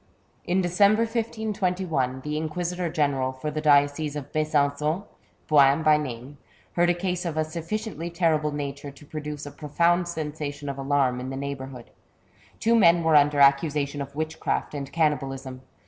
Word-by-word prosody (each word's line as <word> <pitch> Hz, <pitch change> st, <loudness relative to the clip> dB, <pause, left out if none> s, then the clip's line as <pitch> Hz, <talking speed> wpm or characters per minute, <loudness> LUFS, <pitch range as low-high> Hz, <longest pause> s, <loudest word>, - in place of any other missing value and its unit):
In 185 Hz, +2 st, +1 dB
December, 200 Hz, +5 st, +3 dB
1521, 190 Hz, -, -2 dB
the 150 Hz, +2 st, -4 dB
Inquisitor 175 Hz, +3 st, -2 dB
General 140 Hz, -5 st, 0 dB
for 130 Hz, +4 st, -5 dB
the 155 Hz, +1 st, -3 dB
diocese 145 Hz, 0 st, +3 dB
of 145 Hz, -1 st, -6 dB
Besan9on, 155 Hz, +2 st, 0 dB, 0.4 s
Boin 145 Hz, 0 st, +5 dB
by 155 Hz, -1 st, +5 dB
name, 135 Hz, 0 st, -6 dB, 0.3 s
heard 175 Hz, 0 st, +3 dB
a 175 Hz, -, +3 dB
case 180 Hz, 0 st, -2 dB
of 165 Hz, -3 st, -3 dB
a 155 Hz, -, +1 dB
sufficiently 170 Hz, +1 st, -4 dB
terrible 160 Hz, -3 st, +1 dB
nature 145 Hz, -1 st, -5 dB
to 140 Hz, +2 st, -15 dB
produce 150 Hz, -1 st, -6 dB
a 145 Hz, -, -7 dB
profound 170 Hz, +4 st, +1 dB
sensation 150 Hz, -3 st, -5 dB
of 140 Hz, 0 st, -5 dB
alarm 135 Hz, -2 st, +1 dB
in 130 Hz, +1 st, -5 dB
the 135 Hz, -, -5 dB
neighbourhood. 135 Hz, -3 st, -6 dB, 0.7 s
Two 230 Hz, -, +2 dB
men 170 Hz, -6 st, +5 dB
were 160 Hz, -1 st, +3 dB
under 145 Hz, 0 st, +4 dB
accusation 140 Hz, 0 st, +3 dB
of 140 Hz, 0 st, -7 dB
witchcraft 155 Hz, 0 st, -2 dB
and 140 Hz, -2 st, -5 dB
cannibalism. 135 Hz, -5 st, -1 dB
150 Hz, 155 wpm, -25 LUFS, 140-170 Hz, 0.7 s, Boin